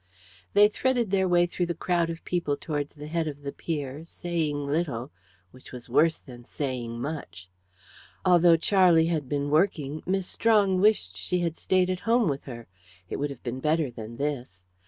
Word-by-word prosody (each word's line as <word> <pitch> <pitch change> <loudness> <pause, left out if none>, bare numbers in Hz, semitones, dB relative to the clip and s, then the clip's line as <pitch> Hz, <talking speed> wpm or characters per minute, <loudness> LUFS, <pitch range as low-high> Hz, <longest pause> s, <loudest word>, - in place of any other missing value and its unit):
They 205 +1 +7
threaded 240 -1 0
their 190 -1 +2
way 175 -1 +4
through 175 0 -2
the 170 - -2
crowd 170 -2 0
of 165 0 -7
people 170 -5 -1
towards 145 -2 -4
the 150 0 -9
head 160 +1 -1
of 145 -1 -7
the 140 - -4
pier, 145 -2 -4
saying 160 -4 -2
little, 140 -4 -2 0.4
which 130 - -15
was 125 -1 -9
worse 160 +5 +4
than 120 -2 -13
saying 120 -3 -4
much. 95 - -6 0.7
Although 175 -2 +6
Charlie 175 -2 +4
had 145 -5 -3
been 145 0 -1
working, 155 -3 +1
Miss 190 0 0
Strong 200 -3 +2
wished 205 - +2
she 180 - -1
had 170 -2 -1
stayed 185 0 +1
at 185 - -3
home 230 +1 +2
with 140 -1 -3
her; 120 -3 -8 0.5
it - - -2
would 145 +1 -1
have 140 -3 -10
been 125 +1 -4
better 155 -1 +1
than 115 0 -9
this. 125 -11 -4
155 Hz, 180 wpm, -27 LUFS, 135-180 Hz, 0.7 s, They